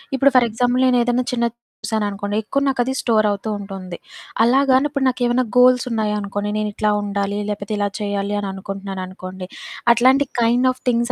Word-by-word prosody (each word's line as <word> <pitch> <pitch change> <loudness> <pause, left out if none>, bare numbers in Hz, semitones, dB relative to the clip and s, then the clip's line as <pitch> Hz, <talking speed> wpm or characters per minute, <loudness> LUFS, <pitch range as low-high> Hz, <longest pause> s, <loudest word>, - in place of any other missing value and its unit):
ఇప్పుడు 275 +1 +4
for 250 - +6
example 245 +3 +1
నేను 250 -1 +3
ఏదైనా 245 +1 +1
చిన్నది 235 -1 -1 0.3
చూసాను 220 -2 -1
అనుకోండి, 205 +1 -4
ఎక్కువ 275 +6 -1
నాకు 265 -2 -1
అది 260 +2 -2
స్టోర్ 220 -3 +2
అవుతూ 205 +2 -4
ఉంటుంది. 195 -3 -7 0.5
అలా 245 +4 +4
గాని 260 +3 +4
ఇప్పుడు 275 -2 -1
నాకేమైనా 245 0 0
గోల్సున్నాయి 250 -4 +3
అనుకోండి, 205 +1 -3
నేను 215 0 -1
ఇట్లా 215 +1 0
ఉండాలి, 200 0 -2
లేకపోతే 205 0 -4
ఇలా 205 0 +1
చేయాలి 200 0 -2
అని 200 - -4
అనుకుంటున్నాను 195 0 -6
అనుకోండి, 185 0 -8 0.5
అట్లాంటి 260 +4 +4 0.2
కైండ్ 240 +2 +3
ఆఫ్ 255 - -11
థింగ్స్ 240 0 +1
220 Hz, 180 wpm, -20 LUFS, 200-250 Hz, 0.5 s, for